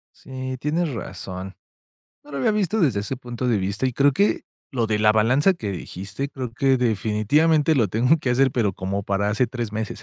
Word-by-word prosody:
Sí, 130 Hz, 0 st, -6 dB
tienes 155 Hz, +2 st, -1 dB
razón. 95 Hz, -4 st, -7 dB, 0.7 s
No 145 Hz, -, -15 dB
lo 140 Hz, -, -4 dB
había 135 Hz, -, +2 dB
visto 210 Hz, +1 st, 0 dB
desde 130 Hz, -, +2 dB
ese 105 Hz, +6 st, -4 dB
punto 125 Hz, 0 st, -5 dB
de 115 Hz, -4 st, +2 dB
vista, 100 Hz, +6 st, -1 dB
y 130 Hz, -, -1 dB
creo 140 Hz, +3 st, +3 dB
que, 200 Hz, +9 st, +1 dB, 0.3 s
lo 120 Hz, -4 st, 0 dB
de 110 Hz, -1 st, 0 dB
la 105 Hz, 0 st, +5 dB
balanza 130 Hz, -, +3 dB
que 110 Hz, -, -5 dB
dijiste, 95 Hz, +8 st, -5 dB
creo 130 Hz, -4 st, -6 dB
que 135 Hz, +3 st, +2 dB
definitivamente 125 Hz, +8 st, +2 dB
lo 115 Hz, -7 st, +2 dB
tengo 125 Hz, -, +3 dB
que 135 Hz, -, -3 dB
hacer, 130 Hz, +2 st, +3 dB
pero 115 Hz, -5 st, 0 dB
como 95 Hz, +2 st, -3 dB
para 100 Hz, +1 st, 0 dB
hace 110 Hz, +4 st, +1 dB
3 120 Hz, -3 st, -5 dB
meses. 110 Hz, 0 st, -4 dB
125 Hz, 205 wpm, -23 LUFS, 105-140 Hz, 0.7 s, la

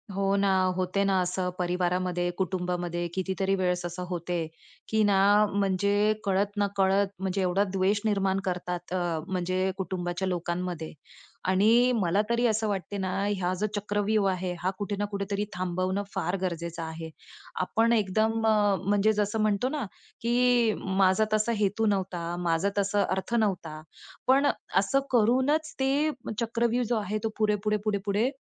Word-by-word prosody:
हो 195 Hz, 0 st, +1 dB
ना, 200 Hz, 0 st, +2 dB, 0.3 s
होते 185 Hz, +2 st, 0 dB
ना 195 Hz, -1 st, +2 dB
असं 180 Hz, 0 st, -1 dB
परिवारामध्ये, 180 Hz, 0 st, 0 dB
कुटुंबामध्ये, 175 Hz, -2 st, -2 dB
कितीतरी 190 Hz, +1 st, 0 dB
वेळेस 180 Hz, -2 st, 0 dB
असं 175 Hz, +1 st, -5 dB
होते, 175 Hz, -2 st, -2 dB, 0.4 s
की 220 Hz, 0 st, +2 dB
ना 200 Hz, -2 st, +3 dB, 0.4 s
म्हणजे 200 Hz, +2 st, +2 dB
कळत-नकळत 200 Hz, 0 st, +1 dB
म्हणजे 190 Hz, 0 st, -1 dB
एवढा 185 Hz, +2 st, +2 dB
द्वेष 195 Hz, +2 st, +1 dB
निर्माण 195 Hz, -2 st, +1 dB
करतात 180 Hz, -1 st, -3 dB
अ, 175 Hz, -3 st, -1 dB
म्हणजे 185 Hz, 0 st, -1 dB
कुटुंबाच्या 185 Hz, -1 st, -3 dB
लोकांमध्ये. 175 Hz, -2 st, -3 dB, 0.5 s
आणि 220 Hz, +7 st, +4 dB
मला 195 Hz, -2 st, +2 dB
तरी 235 Hz, +1 st, +2 dB
असं 220 Hz, 0 st, 0 dB
वाटते 200 Hz, 0 st, -3 dB
ना 190 Hz, -1 st, -2 dB, 0.2 s
ह्या 185 Hz, -3 st, 0 dB
जो 210 Hz, -, +1 dB
चक्रव्यूह 205 Hz, 0 st, +1 dB
आहे, 185 Hz, -1 st, -2 dB
हा 180 Hz, -, 0 dB
कुठे 205 Hz, 0 st, -3 dB
ना 205 Hz, -, +1 dB
कुठेतरी 200 Hz, +1 st, -2 dB
थांबवणं 185 Hz, +2 st, -1 dB
फार 180 Hz, -, -1 dB
गरजेचं 170 Hz, -2 st, -3 dB
आहे. 160 Hz, 0 st, -6 dB, 0.5 s
आपण 225 Hz, +5 st, +2 dB
एकदम 220 Hz, +2 st, +1 dB
अ, 210 Hz, -2 st, +3 dB
म्हणजे 205 Hz, +2 st, +3 dB
जसं 210 Hz, +1 st, -1 dB
म्हणतो 215 Hz, +3 st, +1 dB
ना 290 Hz, -3 st, -3 dB, 0.4 s
की 240 Hz, -1 st, +3 dB
"माझा 190 Hz, +2 st, +2 dB
तसा 215 Hz, +2 st, +2 dB
हेतू 210 Hz, +2 st, +1 dB
नव्हता, 180 Hz, -4 st, -1 dB
माझा 170 Hz, +2 st, +1 dB
तसा 200 Hz, 0 st, +2 dB
अर्थ 190 Hz, +5 st, -2 dB
नव्हता," 180 Hz, -8 st, -1 dB, 0.5 s
पण 275 Hz, +2 st, +5 dB, 0.3 s
असं 200 Hz, +8 st, +3 dB
करूनच 260 Hz, +7 st, +2 dB
ते 275 Hz, +3 st, +2 dB, 0.3 s
चक्रव्यूह 235 Hz, +1 st, 0 dB
जो 240 Hz, -, +2 dB
आहे 210 Hz, 0 st, -2 dB
तो 225 Hz, -, 0 dB
पुढे-पुढे-पुढे-पुढे 210 Hz, +1 st, 0 dB
195 Hz, 140 wpm, -27 LUFS, 180-215 Hz, 0.5 s, पण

